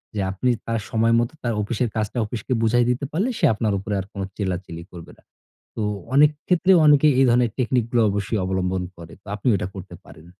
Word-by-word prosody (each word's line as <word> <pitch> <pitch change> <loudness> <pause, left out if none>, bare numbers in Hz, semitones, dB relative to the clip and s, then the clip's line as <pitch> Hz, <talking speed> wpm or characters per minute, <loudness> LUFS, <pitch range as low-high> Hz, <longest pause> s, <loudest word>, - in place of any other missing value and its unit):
যে - - -2
আপনি 110 +7 -1 0.2
তার 115 0 -1
সময় 115 +1 +2
মতো 120 +4 -1
তার 120 -1 0
অফিসের 115 +3 -1
কাজটা 110 +2 -2
অফিসকে 110 +3 -4
বুঝায় 120 +2 +3
দিতে 125 +3 -1
পারলে 195 +11 0
সে 175 - +3
আপনার 110 -1 -1
উপরে 100 +2 -5
আর 95 - -4
কোনো 100 - -4
চিল্লাচিলি 90 -4 -4
করবে 85 -2 -11
না। - - -25 0.5
তো 110 - -2 0.3
অনেক 145 +2 +6 0.2
ক্ষেত্রে 180 +1 +3
অনেকে 150 0 +6
এই 135 - +6
ধরনের 120 -1 +3
টেকনিকগুলো 120 -1 +1
অবশ্যই 100 +2 -2
অবলম্বন 95 0 -1
করে। 85 -1 -12
তো - - -41
আপনি 105 +4 -2
এটা 90 - -3
করতে 95 0 -9
পারেন। 80 - -15
110 Hz, 200 wpm, -22 LUFS, 95-125 Hz, 0.5 s, অনেক